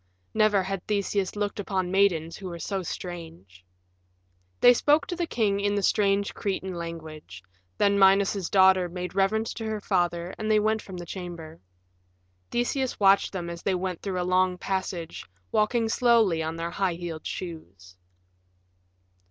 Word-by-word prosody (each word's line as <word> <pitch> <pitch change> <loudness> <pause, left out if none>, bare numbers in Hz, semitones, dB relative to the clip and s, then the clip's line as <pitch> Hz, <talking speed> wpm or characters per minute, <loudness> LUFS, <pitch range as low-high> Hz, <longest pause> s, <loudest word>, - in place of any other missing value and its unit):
Never 210 -3 +3
had 195 -1 -4
Theseus 200 -2 -1
looked 205 0 -2
upon 190 -3 -2
maidens 175 -5 +2
who 195 - -8
were 170 -1 -6
so 190 +4 -3
strange. 165 - -8 1.0
They 245 - +8
spoke 290 +4 +3
to 355 - -4
the 345 -1 -2
king 205 -7 0
in 205 0 0
the 200 - -1
strange 200 0 +2
Cretan 190 -2 -3
language; 160 - -8 0.3
then 200 0 +3
Minos's 195 -1 +4
daughter 190 -2 +5
made 180 +1 -5
reverence 205 +4 +1
to 225 - -6
her 220 -1 -2
father, 175 -3 -1
and 215 0 -2
they 215 0 +5
went 215 +1 +1
from 190 -2 -9
the 175 - -7
chamber. 170 -3 -8 0.9
Theseus 255 +2 -1
watched 195 -1 +4
them 180 -3 -4
as 170 0 -6
they 190 - 0
went 180 -1 -3
through 190 -2 -3
a - - 0
long 185 0 +2
passage, 185 -3 -4 0.3
walking 225 +2 +2
slowly 225 -8 +3
on 160 +1 -3
their 165 +1 -4
high 190 -3 0
heeled 170 -2 -6
shoes. 95 - -8
190 Hz, 160 wpm, -26 LUFS, 170-205 Hz, 1.0 s, They